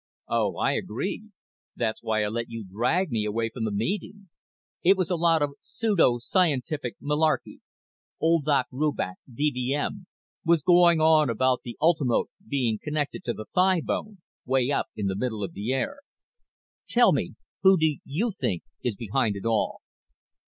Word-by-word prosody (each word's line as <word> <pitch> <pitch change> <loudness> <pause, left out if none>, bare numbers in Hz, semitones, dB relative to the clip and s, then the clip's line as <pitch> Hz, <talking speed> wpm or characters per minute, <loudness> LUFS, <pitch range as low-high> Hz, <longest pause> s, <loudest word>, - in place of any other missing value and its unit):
"Oh, - - 0
I - - +2
agree. 195 - -3 0.5
That's 110 -2 -2
why 110 -2 0
I - - 0
let 115 +2 -3
you 115 -2 -6
drag 125 - 0
me 110 -2 0
away 115 +2 -1
from 115 -3 -3
the 110 - -1
meeting. 190 - -3 0.5
It 190 +3 +5
was 185 -1 -1
a - - +3
lot 165 -2 +3
of 145 - -1
pseudo 195 - +2
scientific 145 - 0
malarkey. 150 +2 0 0.6
Old 165 -2 +2
Doc 140 -4 +3
Rubach, 135 -9 -1
D.V.M., 145 - -1 0.4
was 165 -3 +3
going 175 -1 +5
on 155 -2 +5
about 130 +2 +1
the 120 - -8
ultimote 155 -6 +2 0.2
being 120 -6 0
connected 150 +3 -3
to - - -1
the 110 - -8
thighbone, 190 +3 +1 0.3
way 130 +1 +1
up - - 0
in 105 - -3
the 95 -1 0
middle 110 -1 -2
of 95 - -5
the 105 +5 -3
air. 135 - -2 0.9
Tell - - +5
me, - - -1 0.3
who 190 0 +6
do 155 -3 +1
you 200 +12 -1
think 90 - -2 0.2
is 120 -4 -1
behind 115 0 -1
it 100 - -7
all?" 115 -2 0
140 Hz, 160 wpm, -26 LUFS, 115-170 Hz, 0.9 s, who